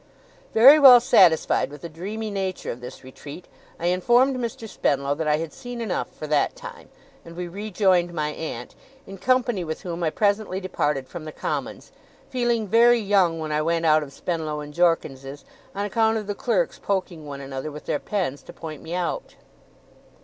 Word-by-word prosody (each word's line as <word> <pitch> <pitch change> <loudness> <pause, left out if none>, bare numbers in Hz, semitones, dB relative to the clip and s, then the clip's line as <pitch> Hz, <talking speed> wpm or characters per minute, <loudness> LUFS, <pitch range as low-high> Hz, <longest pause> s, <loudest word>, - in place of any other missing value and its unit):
Very 270 +7 +9
well 260 -4 +10
satisfied 195 - +4
with 145 0 -11
the - - -4
dreamy 205 +7 -6
nature 190 -2 -3
of 120 - -9
this 125 +2 -10
retreat, 140 +6 -11 0.3
I 170 - -4
informed 240 +9 +3
Mr. 230 -2 -5
Spenlow 140 -7 0
that 155 +1 -3
I 150 0 +3
had 160 0 -5
seen 245 -2 -8
enough 225 -5 -2
for - - -8
that 150 -1 +1
time, - - -11 0.3
and 170 0 -12
we 180 0 -5
rejoined 185 -2 +1
my 155 -3 -2
aunt; 150 -6 -6 0.3
in 195 -1 -10
company 245 -4 +1
with 160 +2 -6
whom 175 -2 -5
I 165 - +1
presently 205 +1 0
departed 150 -8 -2
from 170 -3 -8
the 155 - -6
Commons, - - -5 0.4
feeling 240 -4 0
very 235 +3 +5
young 195 -5 +2
when 155 -1 -4
I 150 0 +1
went 165 +1 0
out 155 -1 +5
of 145 -2 -8
Spenlow 155 -1 -3
and 150 0 -8
Jorkins's, 145 -5 -1 0.3
on 200 +1 -2
account 220 +2 +1
of 215 - -4
the 205 - -3
clerks 260 - -1
poking 185 -6 -3
one 140 -1 -7
another 135 +2 -6
with 150 +1 -10
their 145 - -1
pens 170 -10 -3
to - - -12
point 155 -3 -8
me 170 - -6
out. 180 - -3
175 Hz, 185 wpm, -24 LUFS, 155-215 Hz, 0.4 s, well